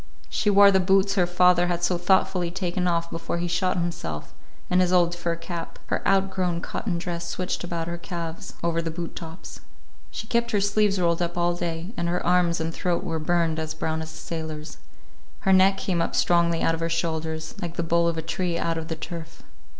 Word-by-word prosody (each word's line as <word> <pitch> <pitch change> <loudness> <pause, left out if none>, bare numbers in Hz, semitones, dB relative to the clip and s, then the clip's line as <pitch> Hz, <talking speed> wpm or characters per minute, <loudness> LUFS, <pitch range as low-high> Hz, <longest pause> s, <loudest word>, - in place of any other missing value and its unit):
She 210 - +1
wore 200 0 +7
the 190 - +4
boots 195 +1 +3
her 180 -3 +2
father 175 0 +4
had 175 0 -1
so 180 +1 +2
thoughtfully 185 -1 +2
taken 180 0 -1
off 170 -1 0
before 165 +1 -3
he 175 +1 -1
shot 180 +2 +1
himself, 170 - -4 0.3
and 180 0 +3
his 180 -1 +2
old 175 -1 +4
fur 175 -1 -2
cap. 170 0 -6
Her - - 0
outgrown 190 -3 +1
cotton 185 -3 -3
dress 170 0 -4
switched 180 +2 -3
about 170 -1 -3
her 170 0 -4
calves, 170 -2 -6
over 165 0 +1
the 165 - -3
boot 170 +1 -5
tops. 165 +1 -8 0.5
She - - -6
kept 235 +1 0
her 210 -3 +2
sleeves 205 0 +2
rolled 170 -1 +2
up 175 0 -2
all 175 0 +2
day, 175 +3 -4
and 170 0 -1
her 175 +1 -1
arms 175 -1 +3
and 160 0 -2
throat 175 0 -1
were 165 -2 -2
burned 165 0 +1
as 160 0 -3
brown 160 0 -2
as 160 0 -6
a - - -12
sailor's. 160 -2 -6 0.6
Her 190 - +3
neck 190 +1 +5
came 175 -3 -1
up - - -1
strongly 170 -1 +3
out 165 - +3
of 165 - -3
her 165 0 -1
shoulders, 160 -1 -2
like 170 -1 -4
the 170 - -1
bole 170 +1 +2
of 165 -1 0
a 160 - -2
tree 170 +1 -1
out 165 -1 -1
of 160 - -6
the 160 - -3
turf. 165 0 -8
170 Hz, 215 wpm, -25 LUFS, 165-180 Hz, 0.6 s, wore